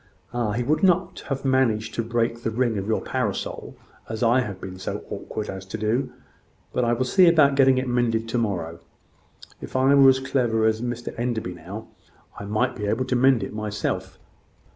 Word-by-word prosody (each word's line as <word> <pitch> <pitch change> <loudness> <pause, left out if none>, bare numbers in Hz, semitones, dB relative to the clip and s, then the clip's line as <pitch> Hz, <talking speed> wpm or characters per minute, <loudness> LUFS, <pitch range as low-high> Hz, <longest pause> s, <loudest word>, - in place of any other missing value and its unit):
"Ah! 120 -4 -1
he 120 +3 -1
would 155 +5 +1
not 185 -1 +2
have 135 -1 -3
managed 115 -5 +1
to - - -1
break 115 0 -1
the 115 - -1
ring 115 0 0
of 95 - -5
your 110 - 0
parasol, - - -3 0.3
as 110 +2 -3
I 120 +2 +4
have 105 -7 -4
been 95 0 -8
so - - -4
awkward 105 - -5
as 95 0 -6
to 105 - -5
do. 110 +5 -1 0.6
But 125 - +1
I 120 0 +2
will 125 +2 0
see 180 +8 +5
about 155 -4 +5
getting 135 -1 +4
it 130 0 -1
mended 120 -2 0
to 120 +1 0
morrow. 85 -7 -2 0.8
If - - -9
I 130 +2 +4
were 135 -1 +8
as 130 0 +4
clever 125 -4 +1
as 110 0 +1
Mr 120 -1 -4
Enderby 115 -6 -2
now, 95 +5 -9 0.5
I 100 - -6
might 110 +5 0
be 105 -3 -4
able 110 +5 0
to 125 - -1
mend 130 -1 +4
it - - -6
myself." 105 -1 -3
120 Hz, 200 wpm, -24 LUFS, 110-130 Hz, 0.8 s, were